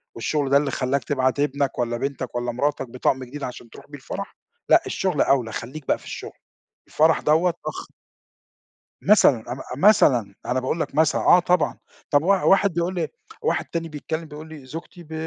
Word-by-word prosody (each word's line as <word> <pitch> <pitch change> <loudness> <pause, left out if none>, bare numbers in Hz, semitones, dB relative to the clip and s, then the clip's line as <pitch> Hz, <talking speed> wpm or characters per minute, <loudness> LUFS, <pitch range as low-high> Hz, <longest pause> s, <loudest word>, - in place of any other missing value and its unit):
والشغل 140 +4 -1
ده 140 - +6
اللي 140 -2 0
خلّاك 135 +1 -1
تبعت 130 -1 0
ابنك 140 -2 0
والّا 120 -1 -1
بنتك 130 -1 -4
والّا 120 0 -1
مراتك 135 +1 -1
بطقم 130 +1 0
جديد 140 +3 -8
عشان 120 -1 -7
تروح - - -14
بيه 145 - -10
الفرح، 200 +8 -7 0.3
لأ - - +7
الشغل 185 -6 -1
أولى، 125 -5 +2
خليك 130 +6 -7
بقى - - +2
في - - -18
الشغل - - -7 0.5
الفرح 160 +1 +3
دوّة 165 +3 +3
أخ - - -5 1.1
مثلًا 130 - +4
ام 125 - -4 0.2
م 150 +9 -1
مثلًا 125 - +4
أنا 130 +1 0
باقُول 130 +6 -2
لك - - -3
مثلًا، 155 0 +3
آه 180 - +6
طبعًا، 180 -1 +1 0.3
طَب 145 +1 +4
وا 195 +1 +3
واحد 195 -2 +4
بيقول 170 +2 -1
لي 175 - -1 0.3
واحد 465 - 0
تاني 165 -1 -4
بيكلم 160 +2 -5
بيقُول 155 +1 -10
لي 150 -4 -11
زوجتي 165 +5 -9
ب 160 0 -11
145 Hz, 190 wpm, -23 LUFS, 130-165 Hz, 1.1 s, لأ